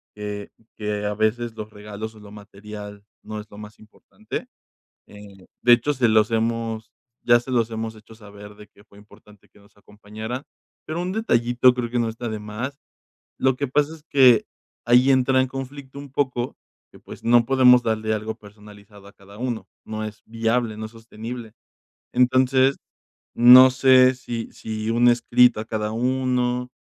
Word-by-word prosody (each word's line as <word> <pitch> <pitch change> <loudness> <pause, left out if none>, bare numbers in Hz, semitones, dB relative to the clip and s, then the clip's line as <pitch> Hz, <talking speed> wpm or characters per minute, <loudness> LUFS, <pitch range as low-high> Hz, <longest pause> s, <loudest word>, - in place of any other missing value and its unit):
que 105 -1 -6 0.3
que 105 -1 -3
a 105 - -1
veces 110 +2 -1
los 110 -1 -7
regalos, 105 +1 -8
o - - -15
lo 105 -1 -14
material 105 0 -11 0.2
no 110 0 -7
es 105 - -10
lo 105 - -14
más 105 0 -12
importante. 110 0 -9 0.6
Eh, 100 -2 -15 0.2
de 120 - +4
hecho, 135 +5 +1
se 125 -3 +1
los 110 0 +3
hemos 115 -1 -2 0.3
ya 120 0 +4
se 130 +2 -9
los 115 -2 +1
hemos 110 0 -5
hecho 110 +1 -16
saber 105 -1 -13
de 105 0 -15
que 100 0 -23
fue 100 -1 -21
importante 105 -1 -20
que - - -23
nos 100 +1 -24
acompañaran. 110 +5 -8 0.4
Pero 160 +2 -4
un 180 +1 -3
detallito, 125 - +2
creo 120 -2 -4
que 120 - 0
no 115 -1 0
está 115 +1 -6
de 110 -1 -5
más. 115 +7 -6 0.6
Lo 130 -1 +2
que 140 -1 -3
pasa 150 +4 0
es 155 - -16
que 130 -4 +6 0.4
ahí 125 +3 +4
entra 130 0 +3
en 130 - +1
conflicto 135 +1 -8
un 140 -1 -10
poco 130 -3 -2 0.3
que, - - -17
pues, - - -12
no 120 0 +4
podemos 125 -2 +5
darle 110 -1 -1
algo 110 +1 -4
personalizado 105 -1 -16
a 100 - -14
cada 100 +1 -17
uno, 120 -3 -4 0.2
no 110 0 -5
es 110 0 -8
viable, 115 0 -1
no 110 0 -6
es - - -13
sostenible. 115 0 -9 0.6
Entonces, 130 +2 +3 0.6
no 125 +2 +9
sé, 130 0 +5
sí 120 -2 -6
sí 110 0 -5
un 120 +1 +4
escrito 120 -1 +3
a - - -5
cada 105 -1 -3
uno, 125 0 -1
115 Hz, 175 wpm, -22 LUFS, 105-125 Hz, 0.6 s, no